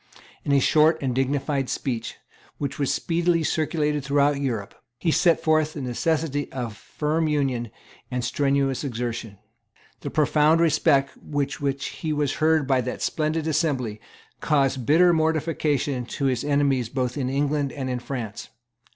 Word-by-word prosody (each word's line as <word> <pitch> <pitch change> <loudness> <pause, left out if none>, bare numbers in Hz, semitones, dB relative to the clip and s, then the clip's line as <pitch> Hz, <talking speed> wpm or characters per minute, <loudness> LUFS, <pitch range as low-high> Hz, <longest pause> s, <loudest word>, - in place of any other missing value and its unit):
In - - -1
a 140 - +5
short 155 +4 +4
and 130 -3 -1
dignified 135 +1 0
speech, 120 -4 -3 0.4
which 140 +1 -4
was 140 - +1
speedily 170 0 +1
circulated 150 -2 0
throughout 140 0 +2
Europe, 115 -7 -3 0.2
he 165 +6 0
set 170 +1 +3
forth 155 -1 +2
the 145 - -6
necessity 145 +3 -1
of 120 -5 -4
firm 155 +7 -2
union 135 -6 0 0.4
and 125 -1 -2
strenuous 135 +1 0
exertion. 115 -5 -4 0.6
The - - -5
profound 155 +1 +3
respect 145 -4 +3
with 145 -1 -3
which 140 -1 -1
he 155 -2 -4
was 145 -2 -1
heard 160 -1 +3
by 130 -1 +2
that 125 +1 -4
splendid 155 0 -1
assembly 135 -9 -1 0.4
caused 135 -4 +1
bitter 175 +4 +5
mortification 155 -4 0
to 140 - -3
his 130 -3 +1
enemies 140 -4 +1
both 125 -1 -2
in 130 -3 -2
England 140 0 0
and 135 -3 -5
in 125 -1 -2
France. 120 -4 -6
140 Hz, 150 wpm, -24 LUFS, 130-155 Hz, 0.6 s, a